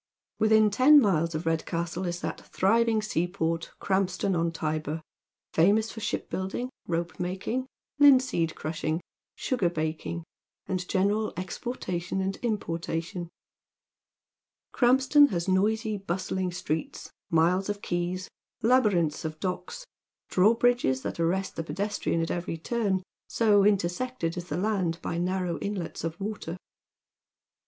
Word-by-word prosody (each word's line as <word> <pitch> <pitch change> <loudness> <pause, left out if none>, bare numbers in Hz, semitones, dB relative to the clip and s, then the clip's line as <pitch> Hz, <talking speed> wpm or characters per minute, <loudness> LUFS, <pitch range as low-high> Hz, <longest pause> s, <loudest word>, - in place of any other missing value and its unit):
Within 220 -1 +5
ten 275 +8 +7
miles 170 - +2
of 155 +2 -3
Redcastle 170 +2 -1
is 175 0 -3
that - - -4
thriving 225 +2 +2
seaport, 165 -4 -1
Krampston 190 0 0
on 165 0 +1
Tybur, 155 -1 -3 0.5
famous 205 +7 +3
for - - -8
shipbuilding, 210 +2 -3 0.2
ropemaking, 180 +8 -2 0.3
linseed 255 - +5
crushing, 155 +1 -2 0.3
sugar 240 -10 0
baking, 160 +1 -3 0.4
and 185 -1 -3
general 205 +3 +1
exportation 185 -2 -3
and 190 0 -1
importation. 170 -5 -3 1.4
Krampston 265 +3 +5
has 170 -2 -2
noisy, 215 +3 +1
bustling 185 0 -2
streets, 160 -2 -4 0.2
miles 175 +4 +2
of 205 0 -3
quays, 175 +1 -2 0.4
labyrinths 205 -11 +3
of 155 -1 -5
docks, 335 - -4 0.5
drawbridges 225 - +3
that - - -4
aiTest 175 +3 0
the 165 - -4
pedestrian 195 -2 -1
at 165 - -2
every 175 -1 -3
turn, 195 0 -1 0.2
so 210 -3 +4
intersected 200 0 0
is 175 -1 -5
the 150 - -2
land 185 -4 0
by 170 - -2
narrow 180 -1 -1
inlets 200 -4 -4
of 165 +2 -4
water. 195 -4 -4
185 Hz, 115 wpm, -28 LUFS, 170-215 Hz, 1.4 s, ten